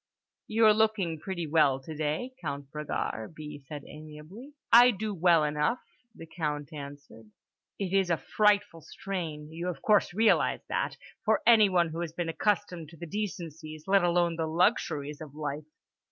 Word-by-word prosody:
"You're 220 Hz, -1 st, +5 dB
looking 210 Hz, -7 st, +1 dB
pretty 175 Hz, 0 st, -4 dB
well 145 Hz, -4 st, +3 dB
today, 155 Hz, -, -3 dB
Count 140 Hz, -2 st, -5 dB
Bragard," 150 Hz, -4 st, -4 dB
B. 150 Hz, -1 st, -8 dB
said 145 Hz, -1 st, -7 dB
amiably. 155 Hz, -, -11 dB, 0.2 s
"I 240 Hz, +2 st, +9 dB
do 215 Hz, -1 st, -2 dB
well 170 Hz, -3 st, +4 dB
enough," 150 Hz, +9 st, 0 dB, 0.4 s
the -, -, -10 dB
Count 150 Hz, -3 st, -4 dB
answered. 140 Hz, -6 st, -10 dB, 0.5 s
"It 195 Hz, -2 st, -3 dB
is 195 Hz, -2 st, +2 dB
a 170 Hz, -, +2 dB
frightful 205 Hz, +2 st, +1 dB
strain—you 160 Hz, -2 st, -6 dB
of 170 Hz, -6 st, -5 dB
course 210 Hz, -2 st, +3 dB
realise 220 Hz, +5 st, +2 dB
that—for 345 Hz, -, -2 dB
anyone 200 Hz, -7 st, +5 dB
who 160 Hz, +1 st, -6 dB
has 170 Hz, -2 st, -4 dB
been 175 Hz, -1 st, -3 dB
accustomed 180 Hz, -2 st, -1 dB
to 165 Hz, -, -15 dB
the 170 Hz, -, -7 dB
decencies, 165 Hz, -5 st, -6 dB
let 195 Hz, -1 st, +3 dB
alone 175 Hz, -1 st, +2 dB
the 160 Hz, -1 st, -1 dB
luxuries, 155 Hz, -, 0 dB
of 150 Hz, -2 st, -10 dB
life. 150 Hz, 0 st, -5 dB
165 Hz, 150 wpm, -29 LUFS, 150-200 Hz, 0.5 s, I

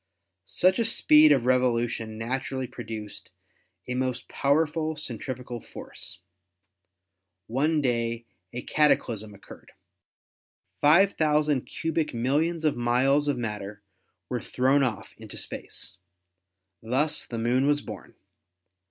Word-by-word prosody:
Such 185 Hz, +3 st, +2 dB
a 230 Hz, -, +2 dB
speed 155 Hz, -8 st, +6 dB
of 135 Hz, -4 st, +4 dB
revolu 125 Hz, -1 st, +2 dB
tion 110 Hz, -1 st, -6 dB
naturally 130 Hz, +3 st, -3 dB
produced 110 Hz, -4 st, -8 dB, 0.6 s
a 125 Hz, -, -2 dB
most 125 Hz, -1 st, -2 dB
powerful 155 Hz, +2 st, +1 dB
centrifugal 125 Hz, -3 st, -5 dB
force. 90 Hz, -, -8 dB, 1.2 s
One 150 Hz, -, +1 dB
day 115 Hz, -2 st, -1 dB, 0.3 s
a 125 Hz, -, -5 dB
cataclysm 110 Hz, -8 st, +1 dB
occurred. 100 Hz, -, -15 dB, 1.1 s
Five 175 Hz, +7 st, +5 dB
thousand 150 Hz, -3 st, +1 dB
cubic 160 Hz, -4 st, -2 dB
mil 125 Hz, +5 st, +1 dB
lions 165 Hz, 0 st, 0 dB
of 150 Hz, -, +2 dB
miles 130 Hz, +5 st, +2 dB
of 145 Hz, -3 st, +1 dB
matter 105 Hz, -3 st, -5 dB, 0.4 s
were -, -, -3 dB
thrown 135 Hz, +3 st, +2 dB
off 120 Hz, -7 st, -2 dB
into -, -, -9 dB
space. -, -, -4 dB, 0.8 s
Thus 135 Hz, +7 st, 0 dB
the 115 Hz, -, -5 dB
Moon 125 Hz, +4 st, +2 dB
was 145 Hz, 0 st, +2 dB
born. 105 Hz, -7 st, -10 dB
130 Hz, 115 wpm, -27 LUFS, 115-150 Hz, 1.2 s, speed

